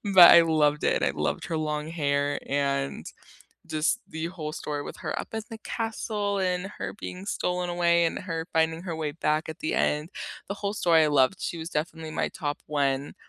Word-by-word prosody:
But 175 -2 +11
I 170 - +10
loved 150 -2 +2
it, - - +2
I - - +3
loved - - -2
her 160 - -2
long 150 -1 -2
hair 145 -3 0
and 140 -1 -1 0.6
just 155 +9 0
the 160 +1 -4
whole 160 -3 -5
story 145 -1 -4
with - - -8
her - - -3
up - - -8
in 220 - -2
the 225 - -7
castle 215 -3 -2
and 180 0 0
her - - -4
being 185 +2 -7
stolen 180 -3 -1
away 170 -1 +3
and 165 - 0
her 165 -3 -4
finding 160 0 +1
her 175 -3 -4
way 155 -2 -2
back 155 0 0
at 160 - -6
the 155 - -1
end. 150 +4 +1 0.4
The 200 - -2
whole 200 0 -3
story 165 -6 +4
I - - +2
loved, 145 +6 +3
she 170 - -3
was 165 +1 -6
definitely 160 +1 -3
my - - 0
top 145 -1 -4
1, 140 -2 0
160 Hz, 205 wpm, -27 LUFS, 150-180 Hz, 0.6 s, But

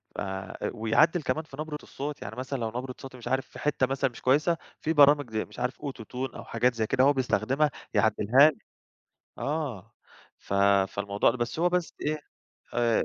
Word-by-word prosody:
ف - - -3 0.5
ويعدّل 120 +10 +3
كمان 135 +5 -1
في 145 -3 -13
نبرة 155 -1 -4
الصوت، 145 +1 -6
يعني 100 +2 -6
مثلًا 130 +2 -4
لو 115 - -1
نبرة 125 +3 -5
صوتي 135 -2 -9
مش 120 - -9
عارف 130 0 0
في - - -12
حتّة 145 -3 +1
مثلًا 135 +1 0
مش 120 - -13
كويسة 150 +6 +3 0.2
في 160 - 0
برامج 145 -3 +6
زي 110 0 -1
مش - - -13
عارف 125 +2 -2
AutoTune 130 -1 -5
أو - - -7
حاجات 120 +2 +1
زي 110 -1 0
كده 130 +3 +3
هو 145 - +6
بيستخدمها 135 +3 +1 0.2
يعدلها 110 +6 +5
لك. 150 - -10 0.7
آه، 125 - -3 0.5
ف - - -5 0.3
فالموضوع 100 +2 +1
ال 120 - -4
بس 120 +3 -3
هو 175 +2 +4
بس 180 -1 -1
إيه 155 +1 0 0.6
آآ 120 -1 +2
130 Hz, 190 wpm, -28 LUFS, 115-145 Hz, 0.7 s, برامج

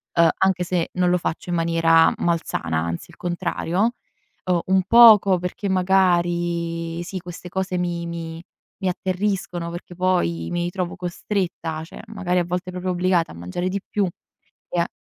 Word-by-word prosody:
uhm, 170 -1 +6
anche 190 -2 +2
se 175 -1 -1
non 180 -1 +2
lo 180 - +3
faccio 170 +1 -4
in 175 - 0
maniera 165 -1 +4
malsana, 160 - -1
anzi, 85 +1 -4
il - - -18
contrario. 180 +4 -1 0.5
Uhm, 180 -2 +2
un 190 0 +4
poco 215 -5 +8
perché, 180 +3 -4
magari, 175 -3 +1
sì, 185 +2 -5
queste 175 0 -9
cose 190 0 -2
mi 175 -1 -2
mi 165 -1 -6 0.4
mi 190 - +1
atterriscono, 180 -2 -2
perché 175 0 -8
poi 85 - 0
mi 175 0 -1
ritrovo 180 -1 -3
costretta, 175 -3 -3
cioè, 165 - -11
magari, 190 -4 -1
a 175 - +2
volte, 180 +1 -3
proprio 180 0 -3
obbligata 180 -1 +1
a - - -12
mangiare 90 - -3
di 195 +1 -3
più 205 -3 +1 0.6
e 175 - -1
a 170 - +2
175 Hz, 165 wpm, -23 LUFS, 170-185 Hz, 0.6 s, poco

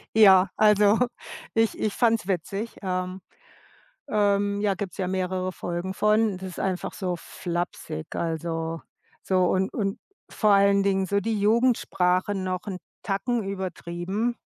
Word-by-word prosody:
Ja, 195 -3 +7
also, 210 0 +5 0.6
ich 225 0 +2
ich 215 - 0
fand's 225 -5 +2
witzig, 195 +4 -3
ähm, 185 0 -3 0.9
ähm, 205 -1 +1
ja, 205 -1 +2
gibt's 195 -1 -6
ja 190 -3 -1
mehrere 185 0 -1
Folgen 175 +1 -4
von. 210 -1 +2
Das 190 - -7
ist - - -9
einfach 185 -2 -2
so 180 -3 -2
flapsig, 175 - -5
also 165 0 -3 0.4
so 185 -1 +2
und 190 +1 +1
und 200 -2 -2 0.3
vor 215 -2 +2
allen 200 0 +5
Dingen 195 -1 +1
so 200 +2 +1
die 215 +1 -1
Jugendsprache 205 -4 +2
noch 185 -1 -2
'n 190 -2 -3 0.3
Tacken 225 +3 -1
übertrieben. 190 +3 -3
195 Hz, 135 wpm, -25 LUFS, 185-210 Hz, 0.9 s, Ja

